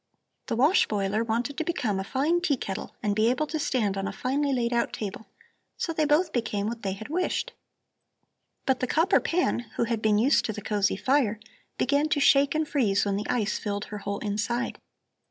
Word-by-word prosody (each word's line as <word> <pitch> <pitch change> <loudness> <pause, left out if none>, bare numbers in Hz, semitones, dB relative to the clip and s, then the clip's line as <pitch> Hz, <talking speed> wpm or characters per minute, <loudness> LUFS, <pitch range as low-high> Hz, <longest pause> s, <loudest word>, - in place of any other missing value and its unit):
The - - -1
wash 285 +10 +4
boiler 205 +1 0
wanted 235 +5 -2
to - - +1
become 250 - -1
a - - -2
fine 295 - +1
tea 295 -7 +1
kettle 195 -4 -5
and 205 -1 +1
be 220 +2 +3
able 275 +5 +1
to 315 +1 -3
stand 220 -9 0
on 195 0 -2
a - - -3
finely 280 +3 -1
laid 240 -2 0
out 235 0 0
table. 210 +1 -5 0.5
So 330 - -2
they 310 -1 +1
both 315 +3 +2
became 215 -4 -1
what 230 +1 -4
they 195 -1 -2
had 215 +3 -8
wished. 365 +9 -1 1.1
"But 265 -1 +2
the 255 - -1
copper 330 +9 +3
pan, 355 -5 0 0.2
who - - +1
had 230 -1 -1
been 215 -1 +3
used 255 +7 +4
to 215 - -2
the 210 - -6
cosy 205 -2 +1
fire, 255 -6 +1 0.4
began 285 +3 +2
to 295 - +1
shake 280 +1 +4
and 315 0 0
freeze 210 -10 +1
when 200 -1 0
the 205 +2 -4
ice 215 -4 0
filled 205 -1 -3
her 210 - -4
whole 200 0 -3
inside. 225 +4 -2
235 Hz, 210 wpm, -27 LUFS, 210-290 Hz, 1.1 s, wash